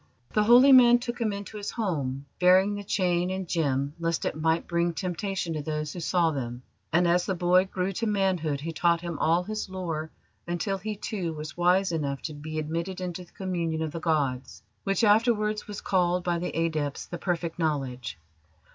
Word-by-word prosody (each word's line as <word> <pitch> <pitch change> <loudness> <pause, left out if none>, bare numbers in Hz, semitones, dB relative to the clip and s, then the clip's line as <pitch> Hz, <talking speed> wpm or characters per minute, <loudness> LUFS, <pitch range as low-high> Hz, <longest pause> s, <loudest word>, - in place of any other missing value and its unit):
"The 210 -1 +3
holy 245 +5 +8
man 245 -2 +8
took 240 0 -5
him 220 -2 +1
into 200 +1 -6
his 205 0 -4
home, 140 - -2
burying 185 +3 +5
the 205 0 -5
chain 180 -2 +1
and 190 -1 -3
gem, 140 -4 0
lest 165 -1 -1
it - - 0
might 160 +1 +1
bring 170 0 0
temptation 185 -1 -2
to 155 - -3
those 150 0 -3
who 180 - -6
saw 170 0 +2
them; 125 -3 -5 0.3
and 175 +2 +3
as 175 +1 +2
the 190 - 0
boy 180 +1 +4
grew 190 0 -2
to 225 +4 -2
manhood 185 -8 0
he 165 +2 -4
taught 170 +1 +2
him 170 -3 -5
all 165 +3 +3
his 215 +1 -4
lore, 165 -4 -4 0.4
until 190 +3 -2
he, 210 +2 -4
too, 190 -5 -3
was 155 -1 -7
wise 180 +2 +3
enough 140 -4 -2
to 155 - -4
be 155 +2 -6
admitted 165 +4 -3
into 180 -1 -4
the 175 - -20
communion 170 -4 -2
of 155 - -3
the 165 - -5
gods, 145 -6 -1 0.2
which 195 +1 +1
afterwards 215 0 +3
was 210 -1 -6
called 180 -1 +1
by 175 -1 0
the 180 - -2
adepts 155 -4 -1
the 175 - -7
Perfect 175 -1 -2
Knowledge. 130 - -2
175 Hz, 195 wpm, -27 LUFS, 160-195 Hz, 0.4 s, holy